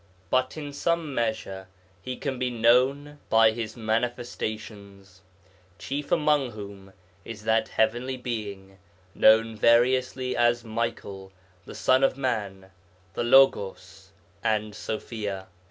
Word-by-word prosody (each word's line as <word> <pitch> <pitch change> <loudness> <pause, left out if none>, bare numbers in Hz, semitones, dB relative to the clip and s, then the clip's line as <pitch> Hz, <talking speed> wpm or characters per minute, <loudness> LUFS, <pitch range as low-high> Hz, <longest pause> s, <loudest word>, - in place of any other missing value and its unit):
But 130 +3 +1
in 145 -2 -6
some 165 0 -1
measure 110 -5 -3 0.3
He 125 +6 -5
can 135 -3 -4
be 125 - 0
known 130 +5 +2
by 110 0 +5
His 110 0 -6
Manifestations, 110 -4 -4 0.6
chief 140 +9 -5
among 150 -4 +2
whom 100 -2 -10 0.3
is 105 0 -9
that 110 +1 +2
Heavenly 120 +4 0
Being 100 -6 -6 0.3
known 110 +1 +4
variously 125 +3 +2
as 120 0 +2
Michael, 105 -4 -4 0.3
the - - -10
Son 130 +1 +3
of 135 - +2
man, 100 -7 -3 0.4
the - - -2
Logos, 95 -7 +2 0.3
and 110 -1 0
Sofia. 105 -2 -5
115 Hz, 115 wpm, -26 LUFS, 105-130 Hz, 0.6 s, by